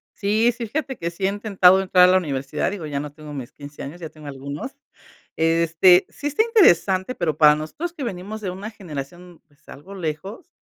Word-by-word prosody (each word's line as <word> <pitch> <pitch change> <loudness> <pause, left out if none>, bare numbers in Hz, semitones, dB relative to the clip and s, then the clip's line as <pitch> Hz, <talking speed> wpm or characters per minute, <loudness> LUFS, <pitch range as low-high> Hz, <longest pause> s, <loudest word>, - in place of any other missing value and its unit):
Sí, 215 +3 +2
sí, 235 - -5
fíjate 270 +1 -4
que 170 0 -4
sí 190 +3 -4
he - - +3
intentado 195 -3 +4
entrar 185 -1 +5
a - - +5
la 185 - +5
universidad, 140 -3 -2
digo, 190 -5 -6
ya 140 -1 -3
no 145 0 -7
tengo 150 -1 -11
mis 130 -4 -7
15 145 0 -10
años, 165 +6 -9
ya 160 - -6
tengo 155 -1 -13
algunos. 140 - -6 0.6
Este, 165 +2 +4
sí 290 - -6
está 295 +9 +2
interesante, 195 - +3
pero, 155 -4 -2
para 150 -1 +7
nosotros 290 - -5
que 295 - -7
venimos 210 -1 -6
de 195 - -3
una 200 +4 -7
generación, 175 -2 -9
pues, 150 0 -32
algo 185 +8 -11
lejos, 190 - -6
180 Hz, 205 wpm, -22 LUFS, 150-205 Hz, 0.6 s, para